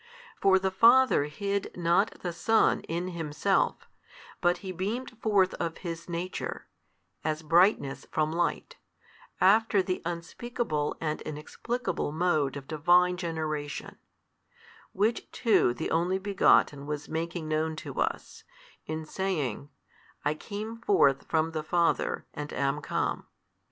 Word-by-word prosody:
For 190 -1 +5
the 190 0 0
Father 235 - +5
hid 200 +7 -3
not 175 +4 +1
the 175 -2 -3
Son 225 +6 +3
in 175 +3 -2
Himself, 170 +3 0 0.5
but 175 0 +3
He 190 - -3
beamed 205 +8 -3
forth 200 -4 +3
of 165 -1 -2
His 170 0 -5
Nature, 175 +2 -4 0.6
as 155 0 -2
brightness 165 -3 +3
from 155 0 0
light, 170 +1 -2 0.6
after 205 0 +4
the 185 0 -2
unspeakable 170 -1 -3
and 155 -1 -2
inexplicable 155 +6 -3
mode 155 -4 +1
of 135 -1 -9
Divine 175 +3 +4
Generation: 155 -4 -4 0.9
which 215 +4 0
too 225 - +3
the 140 +6 -4
Only 175 +3 +1
Begotten 190 -7 +3
was 150 -1 -4
making 165 0 -3
known 155 +1 0
to - - -7
us, - - -3 0.4
in 155 0 -4
saying, 150 - -2 0.6
I 145 - +2
came 210 +7 -6
forth 145 - +3
from 160 0 +1
the 160 -1 -2
Father, 170 +2 0
and 150 0 -6
am 140 +2 0
come. - - -2
170 Hz, 125 wpm, -28 LUFS, 155-190 Hz, 0.9 s, For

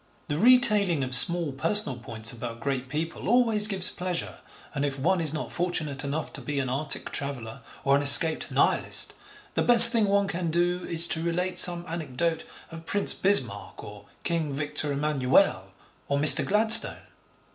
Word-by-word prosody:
The 145 - -5
retailing 210 - +2
of 130 0 -6
small 170 +4 +4
personal 160 - +2
points 115 -1 -3
about 115 -1 -10
great 130 0 -7
people 160 +6 -7
always 225 -3 +1
gives 190 -3 +2
pleasure, 180 -1 -6 0.3
and 140 -2 -6
if 140 -1 -6
one 175 +6 -3
is 155 -3 +1
not 155 - -8
fortunate 155 -6 -6
enough 145 +3 -7
to - - -10
be 145 -1 -8
an 130 -2 -5
Arctic 140 +3 -7
traveller 135 -3 -8 0.2
or 140 0 0
an - - -4
escaped 155 +3 +3
Nihilist, - - -4 0.4
the - - -3
best 235 -1 +9
thing 230 -3 -1
one 200 0 -2
can 180 -3 -6
do 175 +2 -4
is 170 0 -1
to 160 -1 -1
relate 180 +2 -3
some 175 -1 +2
anecdote 165 0 -6 0.3
of 165 0 -14
'Prince 205 - 0
Bismarck, 200 +1 -1
or - - -15 0.2
King 165 -4 -5
Victor 150 +1 -4
Emmanuel, 140 - -2 0.4
or 140 - -4
Mr. 150 +1 +6
Gladstone.' 220 +2 +6
160 Hz, 170 wpm, -23 LUFS, 140-185 Hz, 0.4 s, best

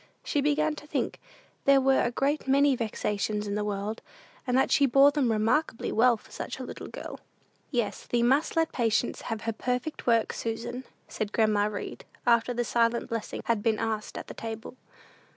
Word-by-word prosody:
She 290 - 0
began 300 +2 +2
to 295 - -10
think - - -2 0.5
there 275 0 +6
were 270 0 +3
a - - +1
great 275 +4 -1
many 280 0 +4
vexations 210 -2 -2
in 200 - -3
the 210 0 -1
world, 205 +1 -3 0.5
and 250 0 +2
that 265 - +2
she 280 - +5
bore 275 +3 +6
them 280 -5 +1
remarkably 225 +5 +1
well 240 +1 +4
for - - -20
such - - -5
a - - -6
little - - -7
girl. - - -8 0.5
"Yes, 235 -6 -2
thee 235 -1 +1
must 270 +6 +2
let 325 0 +2
patience 230 -1 0
have 225 -2 -4
her 225 0 -2
perfect 250 +7 -3
work, 230 -2 +3
Susan," 240 +3 -4 0.2
said 210 -1 -4
grandma 215 -2 +3
Read, 210 -1 -6 0.2
after 235 0 +3
the 240 0 0
"silent 235 0 +1
blessing" 230 -1 -4
had 230 -3 +1
been 220 0 +1
asked 215 -1 -3
at - - -6
the - - -9
table. 225 +1 -7
235 Hz, 190 wpm, -28 LUFS, 220-270 Hz, 0.5 s, there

